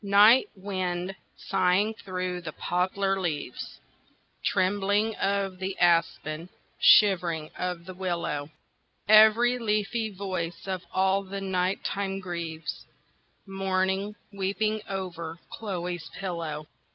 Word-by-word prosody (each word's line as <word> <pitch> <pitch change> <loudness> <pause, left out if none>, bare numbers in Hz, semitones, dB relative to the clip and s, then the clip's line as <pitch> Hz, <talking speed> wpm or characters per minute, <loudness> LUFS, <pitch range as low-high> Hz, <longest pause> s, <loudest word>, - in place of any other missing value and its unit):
NIGHT 205 +5 +6
wind 185 -1 -3 0.2
sighing 195 +3 +2
through 185 -3 -4
the 155 -3 -6
poplar 195 +2 0
leaves, 150 -7 -4 0.6
Trembling 205 +3 +1
of 195 -2 0
the 190 0 -3
aspen, 170 -1 +1 0.3
shivering 170 -6 +5
of 180 -2 -3
the 185 - -7
willow, 170 -5 -2 0.6
Every 220 +3 +6
leafy 215 0 0
voice 185 -4 -4
of 185 -2 -2
all 190 +1 +2
the 195 0 -6
night 190 -1 -1
time 195 -1 -2
grieves, 165 -5 -5 0.6
Mourning, 195 +1 -1 0.2
weeping 210 +2 -1
over 170 -4 -4
Chloe's 180 -6 -4
pillow. 165 -5 -4
190 Hz, 105 wpm, -27 LUFS, 175-200 Hz, 0.6 s, NIGHT